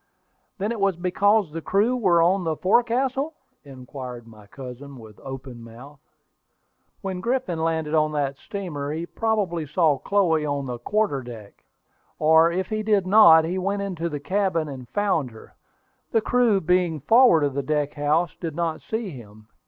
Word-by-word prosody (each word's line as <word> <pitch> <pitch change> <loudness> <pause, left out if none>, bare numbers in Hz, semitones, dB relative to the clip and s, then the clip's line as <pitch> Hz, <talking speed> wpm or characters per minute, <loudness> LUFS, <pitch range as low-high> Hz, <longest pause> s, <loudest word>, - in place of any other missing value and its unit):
"Then 205 +2 -2
it 235 - -4
was 195 -2 +1
because 190 +2 +1
the 165 +1 -5
crew 205 +9 +1
were 180 -8 +3
on 185 +2 +2
the 160 -2 -1
forecastle?" 255 - +1 0.3
inquired 130 -3 -9
my 105 -2 -16
cousin, 135 +3 -10
with 110 -3 -14
open 130 -2 -9
mouth. 125 +5 -13 1.0
"When 190 -2 -4
Griffin 235 -7 -1
landed 160 -2 -1
from 155 -1 +2
that 140 -2 -2
steamer, 150 -8 -5
he 165 +2 -4
probably 190 -7 -2
saw 155 -2 +2
Chloe 175 -5 +1
on 145 -2 -2
the 125 -2 -5
quarter 210 - 0
deck, 115 -5 -12 0.5
or 160 +2 +4
if 185 +2 -1
he 215 +2 -3
did 210 -3 +1
not, 170 -5 +7
he 180 +3 -2
went 200 +2 -2
into 170 -4 -3
the 150 -2 -5
cabin 185 -1 -1
and 130 -4 -9
found 180 -7 0
her. 110 -1 -15 0.6
The 225 - +2
crew 235 -3 +2
being 175 -2 +1
forward 225 - +5
of 140 -2 0
the 140 - -1
deck 150 +1 -1
house 150 +3 0
did 165 -4 -5
not 165 -1 -2
see 220 -3 -4
him. 110 -4 -13
165 Hz, 170 wpm, -24 LUFS, 140-200 Hz, 1.0 s, not